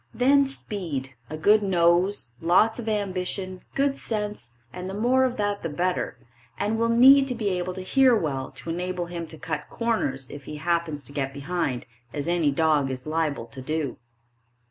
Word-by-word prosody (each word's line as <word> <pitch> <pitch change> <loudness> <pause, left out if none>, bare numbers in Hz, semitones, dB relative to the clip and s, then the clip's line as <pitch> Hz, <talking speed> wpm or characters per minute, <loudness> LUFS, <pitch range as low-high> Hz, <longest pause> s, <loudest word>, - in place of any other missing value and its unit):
Then 275 +2 +4
speed, 170 - -4 0.2
a 155 - -5
good 210 +7 +5
nose, 175 - +2
lots 210 +8 +4
of 225 -2 -3
ambition, 185 -2 -2
good 275 0 +1
sense 210 - -3 0.2
and 180 +1 -5
the 195 - -5
more 250 +5 +3
of 255 -1 -2
that 205 -1 -1
the 165 - -3
better; 175 -2 -1 0.4
and 220 +2 0
will 230 0 +2
need 270 +4 +7
to 250 - -2
be 215 -3 -1
able 180 -1 -2
to 190 - -5
hear 255 +6 +4
well 135 -7 -2
to 165 - -5
enable 180 +1 -2
him 170 -1 -6
to 160 - -11
cut 160 -2 -4
corners 140 - -1
if 145 -1 -9
he 150 - -6
happens 160 -2 -1
to 140 - -11
get 135 -1 -2
behind, 145 -3 -2 0.3
as 145 0 -3
any 170 -3 +2
dog 150 -1 +2
is 130 -1 -5
liable 155 -5 -1
to 120 +3 -10
do. 150 0 -2
175 Hz, 185 wpm, -25 LUFS, 150-210 Hz, 0.4 s, need